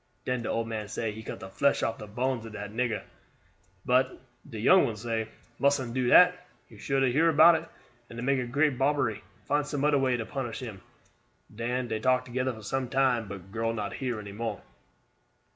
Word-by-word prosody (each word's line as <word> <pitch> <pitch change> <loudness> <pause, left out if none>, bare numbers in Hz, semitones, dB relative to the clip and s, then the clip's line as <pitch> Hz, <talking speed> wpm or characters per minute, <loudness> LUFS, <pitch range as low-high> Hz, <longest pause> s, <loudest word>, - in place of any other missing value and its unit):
Den 125 -1 -1
de - - -4
old 115 0 -1
man 110 -2 -4
say 110 +1 -3
he 110 +1 -8
cut - - -7
de - - -7
flesh 140 +9 +1
off 115 - -1
de 105 - -8
bones 125 +3 -2
ob 115 -1 -9
dat 105 -1 -6
nigger; 115 -1 -1 0.8
but 130 +1 +2 0.3
de 110 - -7
young 185 - +6
one 115 -5 -3
say: 110 0 -2 0.3
'Mustn't 135 -4 +1
do 130 -1 0
dat. 180 +7 +8 0.4
You 110 - -15
sure 135 +5 0
to 135 -2 +3
hear 160 +6 +4
about 165 +2 +7
it, 165 0 -2 0.4
and 115 +1 -7
make 130 -3 0
great 145 -1 +2
bobbery. 135 -6 +1 0.2
Find 145 +1 +1
some 145 -1 -2
oder 145 -1 +4
way 130 -2 +1
to 115 - -4
punish 120 0 -4
him.' 110 -7 -7 0.7
Den 120 +3 -2
dey 110 -1 -2
talk 130 +2 +2
together 130 +1 -1
for 110 -3 -11
some 130 +4 -2
time, 130 -4 +2
but 95 -1 -9
girl 115 +1 -1
not 105 -2 -3
hear 125 -5 -3
any 105 -1 -8
more." 110 0 -4
120 Hz, 205 wpm, -28 LUFS, 110-135 Hz, 0.8 s, dat